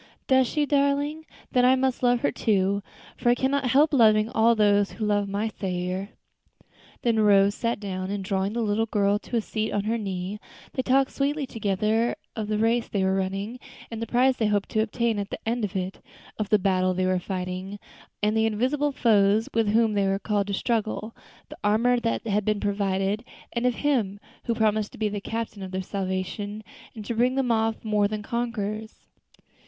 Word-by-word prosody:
"Does 260 -1 +4
she, 300 +3 0
darling? 285 +2 0 0.2
Then 250 - +3
I 255 +1 +6
must 260 -1 0
love 245 -1 +3
her, - - +1
too, 200 -1 +1 0.3
for 240 - 0
I 240 - +5
cannot 270 +1 0
help 295 +5 +4
loving 215 -4 +5
all 230 -1 +3
who 205 0 +2
love 205 -1 +1
my 205 +3 -1
Saviour." 185 0 -3 0.9
Then 230 -2 +2
Rose 200 -1 +5
sat 230 +1 -2
down, 185 -2 -4
and 200 -1 -3
drawing 195 +1 -1
the 235 0 -1
little 215 +1 0
girl 205 -1 +2
to 240 - -6
a - - +2
seat 215 0 -3
on 205 - 0
her 225 +2 -1
knee, 195 0 -4 0.3
they 260 - 0
talked 265 +1 +2
sweetly 285 +1 -1
together 215 0 0 0.2
of 215 -2 -3
the 215 0 0
race 230 +2 +1
they 200 -2 -1
were 190 0 +2
running, 195 +5 -2 0.3
and 225 -1 -5
the 230 - -3
prize 250 +3 +3
they 220 - +1
hoped 205 -1 0
to 220 - +1
obtain 225 0 0
at 200 0 -4
the - - -4
end 235 0 0
of 205 -1 -3
it; 185 0 -3 0.4
of 210 -2 -2
the 210 - +5
battle 185 -2 +1
they 185 0 0
were 185 0 +1
fighting, 185 +1 -4 0.5
and 210 +1 +2
the 220 0 +3
invisible 260 +7 0
foes 215 -4 +3
with 225 -1 +2
whom 225 0 +3
they 200 -1 +1
were 195 0 +1
called 205 -1 -1
to 200 - -3
struggle 220 0 -2 0.3
the - - -10
armor 230 +4 +3
that 230 0 -2
had 210 -1 +1
been 215 0 0
provided, 200 +1 -1 0.3
and 235 +1 +1
of 245 - +1
Him 230 -9 0 0.3
who 235 - 0
had - - -9
promised 215 -1 +1
to - - -11
be 215 -1 0
the 205 -1 -4
Captain 225 -1 -4
of 190 - -5
their 190 0 -3
salvation, 200 +2 -4 0.3
and 215 -2 -8
to 235 - -2
bring 245 +3 +2
them 265 -3 +1
off 225 0 0
more 210 -1 +2
than 210 0 -4
conquerors. 220 -2 -4
215 Hz, 200 wpm, -25 LUFS, 200-235 Hz, 0.9 s, I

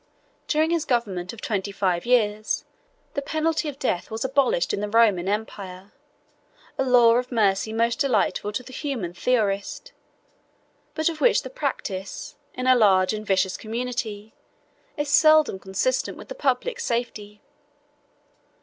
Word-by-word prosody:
During 315 +1 +2
his 335 -2 +1
government 200 -9 -1
of 230 - -11
twenty 200 -2 -2
five 185 -1 -1
years, 215 -3 +1 0.5
the 280 - -2
penalty 315 +2 -1
of 275 - -8
death 185 -10 -2
was 220 +3 -3
abolished 265 -9 +1
in - - -1
the 210 0 -3
Roman 210 -5 +3
empire, 200 -2 -5 0.8
a - - 0
law 240 -2 +5
of 250 +1 -3
mercy 210 -2 +1
most 230 +1 0
delightful 225 -5 +1
to 250 - -3
the 260 - -12
humane 245 - -4
theorist, 210 - -1 1.0
but 315 -1 0
of 325 -2 -2
which - - +4
the - - -8
practice, 195 - -4 0.2
in 255 - -4
a 255 - +6
large 195 -5 +4
and 215 0 -6
vicious 190 -1 +1
community, 220 -2 -4 0.6
is 295 0 -1
seldom 310 -6 +5
consistent 190 - -1
with - - -12
the - - -4
public - - -1
safety. 230 - -3
230 Hz, 145 wpm, -24 LUFS, 200-270 Hz, 1.0 s, a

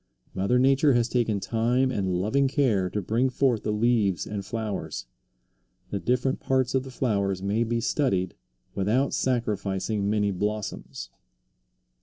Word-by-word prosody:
Mother 100 +6 +1
Nature 135 +2 +4
has 120 -1 +2
taken 115 -4 0
time 120 +5 +1
and 95 -6 -1
loving 110 +10 +2
care 115 -10 +1
to 105 +2 -3
bring 115 +7 +1
forth 125 -4 +1
the 105 - -2
leaves 105 -4 +1
and 105 -2 -4
flowers. 105 - -4 0.9
The 100 - -1
different 125 +4 0
parts 130 -2 0
of 130 - +2
the 130 - -9
flowers 100 -7 -1
may 105 +4 +1
be 120 0 -1
studied 95 - 0 0.4
without 115 +8 +1
sacrificing 105 -4 -1
many 105 -1 +1
blossoms. 105 +2 -4
110 Hz, 140 wpm, -26 LUFS, 100-125 Hz, 0.9 s, Nature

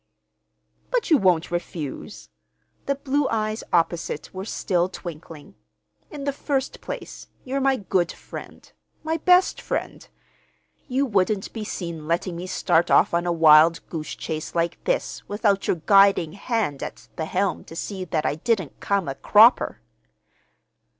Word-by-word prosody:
"But - - -1
you 310 - +7
won't 175 -4 +2
refuse." 170 +1 -5 0.6
The 280 - +1
blue 280 +1 0
eyes 215 0 -2
opposite 170 -2 -1
were 190 +1 -6
still 180 -4 0
twinkling. 165 - -9 0.6
"In 285 - -7
the 280 0 -1
first 275 -1 -2
place, - - -7 0.2
you're 270 +1 -2
my 270 0 +3
good 185 -5 0
friend—my 320 +1 -8
best 360 +3 +3
friend. - - -4 0.8
You 270 +1 +1
wouldn't 200 -3 0
be 220 - -5
seen 170 -6 -6
letting 170 +2 -1
me 175 +2 -6
start 170 -2 +1
off - - +4
on 170 +1 0
a - - +2
wild 160 0 +5
goose 155 -2 -5
chase 155 -1 -5
like 170 0 -1
this - - -1
without 205 -1 +1
your - - +2
guiding 195 -5 +5
hand 205 - -2
at - - -7
the 160 - -3
helm 190 +3 -1
to 165 - -11
see 190 +2 -4
that 160 -3 -2
I - - +1
didn't 185 - -2
come 200 -4 0
a 135 - -2
cropper." 215 - +4
190 Hz, 145 wpm, -24 LUFS, 165-230 Hz, 0.8 s, you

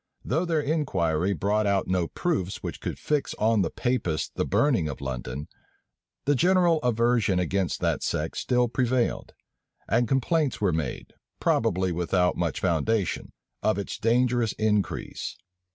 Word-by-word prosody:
Though 160 +8 0
their 165 -3 +1
inquiry 95 - 0
brought 105 +2 +1
out 100 -1 +2
no 90 -2 +1
proofs 105 - -2
which - - -5
could - - -4
fix 150 -2 -1
on 110 -1 +2
the 85 - +1
Papists 115 -11 -1
the - - -1
burning 110 - +2
of 70 - -6
London, 65 +1 -5 0.8
the 145 - +4
general 175 +2 +4
aversion 115 -5 +2
against 90 0 -1
that - - 0
sect - - -2
still 125 -1 +2
prevailed; 120 +1 0 0.5
and 120 0 +2
complaints 140 +2 +1
were 100 -5 +2
made, 80 -1 -4 0.3
probably 95 -5 +1
without 90 +1 +1
much 85 -4 -1
foundation, 95 +3 0 0.3
of 110 - +1
its 100 - -4
dangerous 120 0 +2
increase. 105 -2 -1
110 Hz, 140 wpm, -26 LUFS, 90-125 Hz, 0.8 s, the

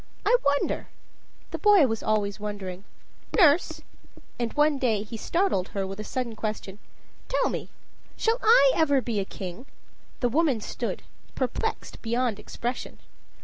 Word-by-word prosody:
I - - +5
wonder" 285 0 +1 0.6
the - - -4
boy 410 -7 +6
was 225 -3 -1
always 210 -2 0
wondering 200 -2 -6 0.5
"Nurse," 340 -4 +4 0.6
and 235 -1 -1
one 295 -1 +3
day 220 -6 +1
he 220 +2 -8
startled 335 - 0
her 195 -1 -3
with 195 +1 -6
a - - -3
sudden 235 0 -3
question, 210 -2 -4 0.5
"tell - - +1
me - - -5 0.5
shall 455 +2 +1
I 280 - +7
ever 285 -4 +3
be 235 -4 -2
a 195 - -1
king?" 190 +7 -7 0.5
The 245 - +2
woman 285 -2 +2
stood, - - -4 0.3
perplexed 270 - -3
beyond 235 -2 0
expression. 240 +4 -5
235 Hz, 145 wpm, -26 LUFS, 210-285 Hz, 0.6 s, I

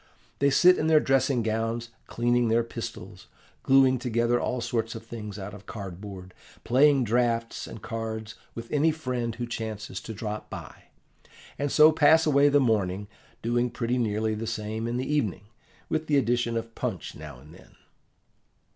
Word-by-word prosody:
They 140 - +4
sit 180 +6 +5
in 155 - 0
their 160 -1 +6
dressing 135 -3 +2
gowns, 115 +1 -2 0.2
cleaning 120 0 +1
their 115 +1 +3
pistols, 115 - -8 0.3
gluing 130 -1 +4
together 120 0 +1
all 125 - -1
sorts 115 -1 -2
of 115 0 -8
things 105 -3 -7
out 100 0 -7
of 105 -1 -12
cardboard, 95 -2 -8 0.3
playing 135 +2 +4
draughts 115 0 0
and 115 - -10
cards 110 -1 -5 0.2
with 115 0 -8
any 150 +2 +3
friend 125 -7 -3
who 120 - -3
chances 110 -4 -5
to 110 - -7
drop 105 0 -5
in, - - -13 0.3
and 145 -1 -1
so 155 +1 +7
pass 160 +1 +5
away 145 -1 +5
the 145 0 +4
morning, 105 -5 0 0.3
doing 120 +1 +1
pretty 120 +1 -1
nearly 110 -1 0
the 110 +1 -4
same 110 0 -3
in 120 +1 -2
the 130 - -2
evening, 145 -11 -1 0.4
with 155 0 -2
the 145 - +3
addition 120 -2 +1
of 115 0 -5
punch 110 -11 -4
now 75 -4 -10
and 75 +4 -15
then. - - -18
115 Hz, 165 wpm, -27 LUFS, 110-130 Hz, 0.4 s, so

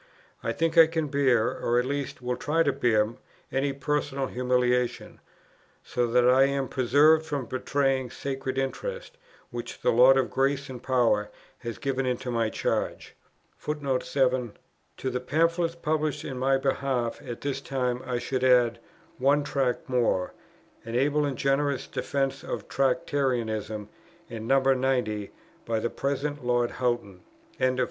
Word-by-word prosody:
I - - -1
think 165 0 +2
I 165 - +9
can 160 -2 -2
bear, 130 -5 +3
or 120 - +1
at 125 - +2
least 140 -1 -4
will 125 0 -1
try 160 +5 +1
to 140 -3 +1
bear, 115 -4 +2 0.4
any 135 +1 0
personal 140 0 -1
humiliation, 125 -1 0 0.6
so 120 -1 -1
that 120 +1 +3
I 130 +2 +6
am 140 -1 -1
preserved 145 +5 +4
from 145 -5 -3
betraying 130 +1 0
sacred 135 +1 -4
interests, 485 - -4 0.4
which 120 0 -7
the - - +4
Lord 130 +3 +7
of 135 - 0
grace 135 0 0
and 125 -2 -8
power 120 -5 +2 0.3
has 120 -2 -6
given 135 -1 -1
into 125 0 -2
my 115 -2 +1
charge." - - -2 0.5
To 140 -2 -2 0.8
the 130 -1 -1
Pamphlets 165 +5 +1
published 155 -2 -1
in 130 -2 -5
my 135 +1 +3
behalf 135 -3 -1
at 120 - -7
this 140 -1 -2
time 125 -3 -2
I 125 -1 -2
should 130 +1 -2
add 120 -2 +4 0.4
"One 140 +3 +3
Tract 135 -4 -1
more," 120 -8 +1 0.5
an 115 +1 -6
able 145 +3 +2
and 140 -3 -3
generous 140 +1 +1
defence 135 -1 -2
of - - -5
Tractarianism 120 -7 -1 0.4
and 115 -1 -6
No. 135 +2 +5
90, 125 -6 +1 0.3
by 115 -1 -1
the 120 - -2
present 140 +1 -2
Lord 120 -1 +1
Houghton. 120 -7 -2 0.4
CHAPTER - - -3
III. 130 - -4
130 Hz, 150 wpm, -27 LUFS, 125-140 Hz, 0.8 s, I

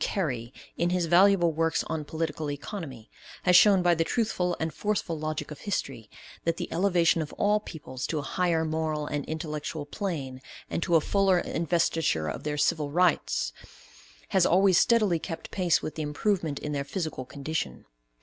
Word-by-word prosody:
Carey, 125 - -2 0.3
in 170 - +1
his 180 -1 +1
valuable 175 0 +5
works 165 +1 +1
on 160 -1 -3
political 155 -1 -3
economy, 145 - -6 0.4
has 180 -1 +4
shown 195 0 +7
by 175 -1 +5
the 165 -1 +1
truthful 180 -4 -1
and 160 -1 -2
forceful 205 -5 -1
logic 155 0 -4
of 150 - -8
history, 135 - -4 0.3
that 165 0 0
the - - -3
elevation 175 -3 +3
of 150 - -5
all 210 +1 +2
peoples 140 -9 -7
to 160 - -2
a 145 - -2
higher 170 +1 0
moral 155 -1 -1
and 145 -1 -3
intellectual 155 -1 -4
plane, 145 -7 -4 0.3
and - - -1
to 170 -1 +1
a 160 - +6
fuller 195 +2 +3
investiture 165 - 0
of 75 - -4
their 150 0 -3
civil 150 0 +1
rights, 150 - +1 0.8
has 190 -2 +3
always 185 0 +5
steadily 215 -8 +3
kept 165 0 -7
pace 180 -3 +1
with 155 - -4
the 160 - -5
improvement 155 0 -1
in 150 - -4
their 140 -1 -1
physical 155 -2 -4
condition. 140 - -4
160 Hz, 170 wpm, -27 LUFS, 150-180 Hz, 0.8 s, shown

